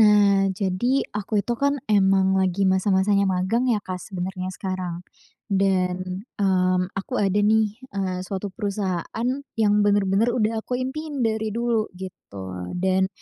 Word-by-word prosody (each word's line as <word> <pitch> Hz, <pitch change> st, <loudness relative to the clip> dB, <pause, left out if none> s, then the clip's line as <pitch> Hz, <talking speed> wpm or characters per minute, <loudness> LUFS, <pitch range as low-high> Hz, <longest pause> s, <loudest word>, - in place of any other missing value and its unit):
Nah, 205 Hz, -2 st, +5 dB
jadi 205 Hz, +7 st, 0 dB
aku 210 Hz, 0 st, -1 dB
itu, 240 Hz, -, -1 dB
kan, 280 Hz, 0 st, +1 dB
emang 190 Hz, -1 st, +4 dB
lagi 190 Hz, +1 st, +1 dB
masa-masanya 195 Hz, +1 st, +3 dB
magang, 190 Hz, +7 st, +1 dB
ya, 215 Hz, -4 st, +2 dB
Kak, 185 Hz, -1 st, -5 dB
sebenarnya 185 Hz, -1 st, -4 dB
sekarang. 185 Hz, -2 st, -4 dB, 0.5 s
Dan, 185 Hz, -1 st, 0 dB, 0.2 s
mmm, 185 Hz, -1 st, +2 dB
aku 195 Hz, +6 st, -3 dB
ada, 200 Hz, 0 st, +2 dB
nih, 215 Hz, +1 st, +2 dB
eee, 185 Hz, -2 st, -2 dB
suatu 195 Hz, 0 st, -4 dB
perusahaan 200 Hz, +2 st, -2 dB, 0.3 s
yang 210 Hz, -1 st, +4 dB
bener-bener 205 Hz, +3 st, +2 dB
udah 225 Hz, -2 st, +1 dB
aku 250 Hz, 0 st, -2 dB
impiin 290 Hz, +2 st, -4 dB
dari 220 Hz, -1 st, 0 dB
dulu 235 Hz, -2 st, 0 dB
gitu. 95 Hz, -, -7 dB
Dan, 190 Hz, +1 st, +2 dB
195 Hz, 135 wpm, -24 LUFS, 185-215 Hz, 0.5 s, Nah